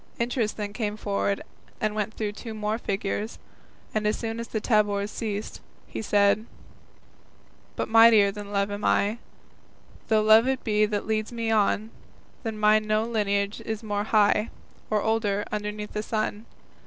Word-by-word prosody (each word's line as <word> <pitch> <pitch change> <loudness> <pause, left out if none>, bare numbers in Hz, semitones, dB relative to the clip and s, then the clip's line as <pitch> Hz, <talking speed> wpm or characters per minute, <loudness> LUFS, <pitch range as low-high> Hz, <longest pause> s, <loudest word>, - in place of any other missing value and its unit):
Interest 235 -2 -1
then 205 -1 -4
came 215 -2 -2
forward 200 -1 -1 0.4
and 215 -1 0
went 215 0 -2
through 210 -2 -2
two 220 +1 -8
more 215 +1 -2
figures, 205 +1 -3 0.6
and 215 -1 0
as 210 - +1
soon 225 0 -4
as 230 - -5
the 220 - -2
tabors 205 -2 +1
ceased, 215 -2 -4 0.2
he - - -6
said: 205 +1 +2 1.3
But - - -2
mightier 225 -3 +7
than 205 0 -8
Love 200 0 0
am 205 0 -5
I, 210 +3 +2 0.9
Though 220 -2 +3
Love 220 +3 +6
it 265 -1 -1
be 210 -1 +2
that 205 -1 -2
leads 215 0 -1
me 230 -1 -2
on, 215 0 +1 0.5
Than 220 -2 -4
mine 215 0 +4
no 215 0 +2
lineage 205 -3 -1
is 220 0 -4
more 205 -1 -2
high, 210 0 +3 0.4
Or 215 -1 +1
older, 215 -2 0
underneath 210 0 -4
the 210 - -1
sun. 215 0 -3
215 Hz, 160 wpm, -26 LUFS, 205-220 Hz, 1.3 s, mightier